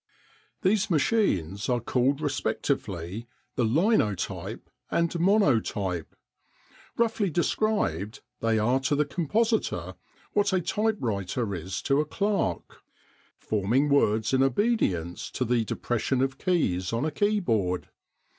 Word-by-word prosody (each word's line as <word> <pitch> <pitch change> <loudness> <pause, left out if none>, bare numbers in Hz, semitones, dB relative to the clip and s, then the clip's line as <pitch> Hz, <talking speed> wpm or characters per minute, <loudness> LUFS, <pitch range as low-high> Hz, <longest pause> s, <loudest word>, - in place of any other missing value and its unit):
These 205 +2 +2
machines 120 - +1
are 125 -1 +2
called 130 +4 +1
respectively 110 - -2 0.3
the 125 - +1
Linotype 120 - 0 0.2
and 170 0 0
Monotype. 115 - +1 0.8
Roughly 225 -4 +1
described, 165 - 0 0.2
they 115 -1 +1
are 120 +5 +2
to 135 +2 0
the 150 +1 +2
compositor 215 - 0 0.4
what 205 -1 +2
a 185 - +3
typewriter 125 - -1
is 90 +1 -4
to 140 +1 +3
a - - -2
clerk 200 +6 -2 0.6
forming 110 +8 +1
words 110 -5 +2
in 130 - +4
obedience 130 - 0
to 130 - -2
the 120 -1 +2
depression 125 +4 -1
of 135 0 -2
keys 95 - 0
on 115 +5 0
a 155 - -1
keyboard. 120 - 0
135 Hz, 115 wpm, -27 LUFS, -, 0.8 s, in